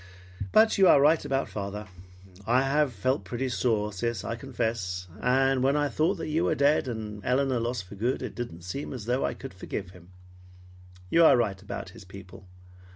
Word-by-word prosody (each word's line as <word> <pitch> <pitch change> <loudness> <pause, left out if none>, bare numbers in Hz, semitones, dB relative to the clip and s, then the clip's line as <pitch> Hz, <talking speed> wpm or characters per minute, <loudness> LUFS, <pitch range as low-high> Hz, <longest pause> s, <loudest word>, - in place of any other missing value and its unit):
But 220 -1 +5
you 190 - +7
are 145 - +7
right 155 +3 +4
about 135 -1 -1
father. 105 +1 -5 0.6
I 125 +3 +4
have 145 +1 +2
felt 130 +6 -1
pretty 130 +2 -3
sore, 110 -4 0
sis, 115 +1 -2
I 115 - -3
confess, 110 -8 -3
and 135 +1 +2
when 135 +2 +3
I 145 -1 +1
thought 165 +7 0
you 160 +2 0
were - - +1
dead, 140 -1 +3
and 105 -4 -5
Elinor 130 +1 +1
lost 120 -2 -2
for 90 - -13
good, 115 +6 -1
it - - -5
didn't 90 -9 -7
seem 115 +13 -5
as 120 -6 -7
though 125 +3 0
I - - -1
could 135 - -9
forgive 95 0 -6
him. 90 -1 -16 1.0
You 170 - +5
are 160 - +7
right 100 -5 -1
about 95 - -6
his 110 +2 -13
people. 95 -1 -13
120 Hz, 190 wpm, -27 LUFS, 100-135 Hz, 1.0 s, you